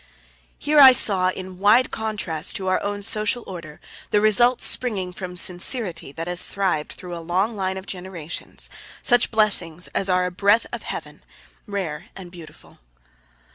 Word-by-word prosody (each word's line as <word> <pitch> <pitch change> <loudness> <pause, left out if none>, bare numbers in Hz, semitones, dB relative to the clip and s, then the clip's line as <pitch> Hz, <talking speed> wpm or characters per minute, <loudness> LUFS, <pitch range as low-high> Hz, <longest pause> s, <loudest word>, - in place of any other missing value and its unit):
Here 300 0 +2
I 265 -2 +10
saw, 190 -6 +3
in 185 0 -7
wide 215 +6 +4
contrast 210 -8 -2
to 190 - -4
our 185 - +1
own 205 0 -4
social 215 +3 0
order, 170 -5 -9 0.3
the 210 - +3
results 235 +4 +3
springing 195 -8 -1
from 180 0 -7
sincerity 180 - 0
that 165 +2 -5
has 180 0 0
thrived 185 -6 -2
through 180 -1 -8
a 170 - -7
long 185 +7 -1
line 190 -1 -2
of 190 - -8
generations. 180 -4 -5 0.4
Such 245 0 +3
blessings 180 -6 +2
are - - -27
as 195 - -1
a 180 0 +1
breath 200 +5 +2
of - - -4
Heaven, - - -8 0.4
rare 180 -6 -4
and 180 -2 -10
beautiful. 170 -3 -14
190 Hz, 160 wpm, -22 LUFS, 180-215 Hz, 0.4 s, I